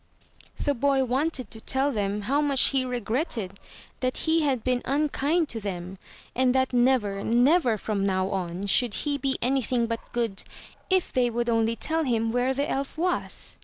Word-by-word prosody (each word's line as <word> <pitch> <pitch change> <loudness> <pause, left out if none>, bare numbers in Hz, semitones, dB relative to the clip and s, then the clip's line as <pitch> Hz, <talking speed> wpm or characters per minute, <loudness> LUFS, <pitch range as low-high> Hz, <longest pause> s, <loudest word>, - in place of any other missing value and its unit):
The 285 - 0
boy 275 +1 +2
wanted 260 -2 -1
to 220 - -9
tell 270 +4 +1
them 205 -3 -1
how 275 +8 +1
much 280 -3 +3
he 270 -2 +1
regretted 240 - -2 0.4
that 255 0 -1
he 325 0 +3
had 265 -6 0
been 250 -1 +1
unkind 300 +3 +1
to 230 - -4
them; 185 -2 -6 0.4
and 255 0 +2
that 260 -1 +1
never, 240 -6 +2
never, 245 +1 +3
from 205 -1 -2
now 190 -1 +1
on, 185 0 -3
should 225 +2 +2
he 290 -1 0
be 270 -1 0
anything 250 -2 +1
but 230 0 -2
good, 230 -5 -1 0.5
if 375 -1 +1
they 250 -1 +2
would 235 0 -1
only 225 0 +1
tell 320 +6 -1
him 230 -4 0
where 245 +2 +1
the 280 +2 -1
elf 275 +2 -3
was. 355 +2 -2
250 Hz, 175 wpm, -26 LUFS, 220-275 Hz, 0.5 s, much